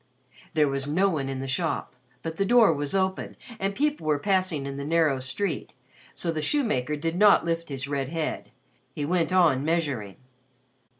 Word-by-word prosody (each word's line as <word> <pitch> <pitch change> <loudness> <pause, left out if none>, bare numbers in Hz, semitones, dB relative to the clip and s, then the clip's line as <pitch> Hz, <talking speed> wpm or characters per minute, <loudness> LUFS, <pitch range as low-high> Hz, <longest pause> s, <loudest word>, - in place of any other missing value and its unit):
There 150 -2 +4
was 135 0 -1
no 185 +7 +2
one 140 -6 -2
in 135 -1 -4
the 135 - -4
shop, 160 -1 -2 0.3
but 165 0 -5
the 195 - +2
door 225 -3 +5
was 145 +3 -3
open 190 -1 -1 0.2
and 195 +1 -1
people 290 - -1
were 150 -1 +3
passing 185 -4 0
in 140 0 -5
the 140 - -4
narrow 155 -3 +2
street; 135 +6 -3 0.4
so 170 - -1
the 155 -1 -2
shoemaker 150 - 0
did 165 +3 -2
not 205 -2 +5
lift 165 -1 -2
his 135 -1 -4
red 140 -2 -2
head. 160 -1 -3 0.5
He 145 - -2
went 175 +2 +1
on 165 -8 +4
measuring. 145 - -1
160 Hz, 180 wpm, -26 LUFS, 140-185 Hz, 0.5 s, door